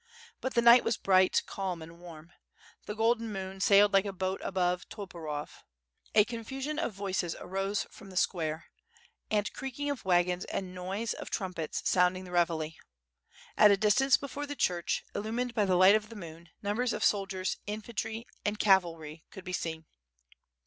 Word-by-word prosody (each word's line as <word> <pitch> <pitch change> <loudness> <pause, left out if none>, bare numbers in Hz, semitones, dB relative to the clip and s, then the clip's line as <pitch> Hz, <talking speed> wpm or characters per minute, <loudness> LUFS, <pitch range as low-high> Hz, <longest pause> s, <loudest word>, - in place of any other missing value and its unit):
But 260 - -4
the 235 - +3
night 235 +1 +8
was 230 - 0
bright, 185 -1 +3
calm, 190 -3 -4
and 165 +1 -13
warm. 170 -1 -12 0.6
The 210 - -4
golden 225 0 +1
moon 190 -1 -6
sailed 200 +1 +6
like 195 +1 +4
a 200 - -2
boat 190 0 -3
above 180 -1 -1
Toporov. 165 -8 -7 0.5
A 210 - +7
confusion 265 +6 -4
of 330 - -1
voices 190 -3 -2
arose 195 +2 -2
from 195 - -13
the 185 - -8
square, 160 -4 0 0.6
and 210 -1 0
creaking 275 +2 -4
of 280 - -5
wagons 180 -1 +2
and 185 -2 -4
noise 190 +5 -3
of - - -8
trum 190 -3 -3
pets 160 -3 -3
sounding 180 0 +3
the 180 - -10
reveille. 165 -3 +1 0.8
At 210 - +7
a 200 - +5
distance, 245 +7 +4
before 285 +1 -6
the 290 - -5
church, 175 -9 0
illumined 230 +4 -2
by 210 -3 +2
the 185 -2 +2
light 185 +2 +8
of 215 0 +1
the 230 - -10
moon, 170 -3 -10
numbers 225 +4 0
of - - -3
soldiers, 195 -2 0
in 210 +1 -3
fantry, 225 0 -4 0.2
and 205 0 -1
cavalry, 165 -6 +2
could 190 - -10
be 185 -1 -6
seen. 160 -2 -3
195 Hz, 175 wpm, -30 LUFS, 180-220 Hz, 0.8 s, night